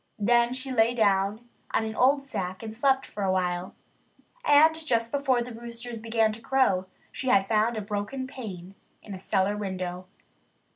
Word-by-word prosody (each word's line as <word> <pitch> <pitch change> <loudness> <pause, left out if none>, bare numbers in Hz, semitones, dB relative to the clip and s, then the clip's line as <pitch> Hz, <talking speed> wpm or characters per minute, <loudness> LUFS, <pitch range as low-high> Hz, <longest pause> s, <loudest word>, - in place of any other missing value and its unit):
Then 235 +3 +3
she 260 +1 -5
lay 230 0 +3
down 205 +1 +1 0.3
on 220 - +2
an 220 - -4
old 275 +2 +3
sack 190 -7 -5
and 220 0 -7
slept 265 +2 +2
for 205 - -8
a 190 -1 +1
while. 180 -1 -1 0.7
And 310 -3 +6
just 240 -8 -1
before 270 -4 +1
the 245 0 -8
roosters 235 0 -7
began 225 -1 +1
to 220 +2 -9
crow 230 -8 +2 0.2
she 260 - -6
had 195 -6 +4
found 220 +2 +1
a - - -2
broken 210 +6 -4
pane 195 -9 -8 0.3
in 205 - -8
a 190 - -7
cellar 195 +1 0
window. 185 -3 -4
225 Hz, 175 wpm, -27 LUFS, 195-250 Hz, 0.7 s, And